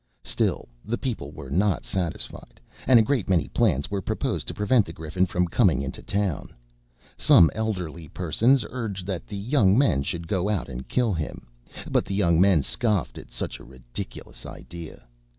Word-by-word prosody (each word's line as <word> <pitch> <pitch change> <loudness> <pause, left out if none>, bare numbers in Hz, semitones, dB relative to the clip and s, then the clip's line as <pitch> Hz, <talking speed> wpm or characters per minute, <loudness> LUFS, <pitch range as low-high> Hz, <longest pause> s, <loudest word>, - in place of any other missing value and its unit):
Still - - 0 0.2
the 120 +2 -2
people 130 -4 -4
were 65 - -9
not 95 +5 +1
satisfied, 85 -10 -4 0.3
and 130 - +8
a 115 - +6
great 120 -4 0
many 90 -3 +3
plans 85 - +1
were 100 -1 -1
proposed - - -2
to - - -3
prevent 105 +3 +3
the - - -6
Griffin 80 +4 -1
from 90 0 0
coming 85 - +3
into 70 -1 -6
the - - -23
town. 100 -5 -2 0.6
Some 80 - +6
elderly 90 -8 -3
persons 110 - +2
urged 105 -7 -4
that 95 -3 -4
the 100 - -6
young 105 -2 +3
men 130 - +3
should 85 +4 -4
go 95 +2 0
out 100 -9 -1
and 65 0 -7
kill 120 -5 +1
him; 80 -6 -4 0.4
but - - +2
the 95 - -3
young 85 -4 +3
men 95 -7 +5
scoffed 105 - 0
at - - -12
such - - -4
a - - -12
ridiculous 65 -2 -8
idea. 85 -6 -10
95 Hz, 180 wpm, -25 LUFS, 80-105 Hz, 0.6 s, and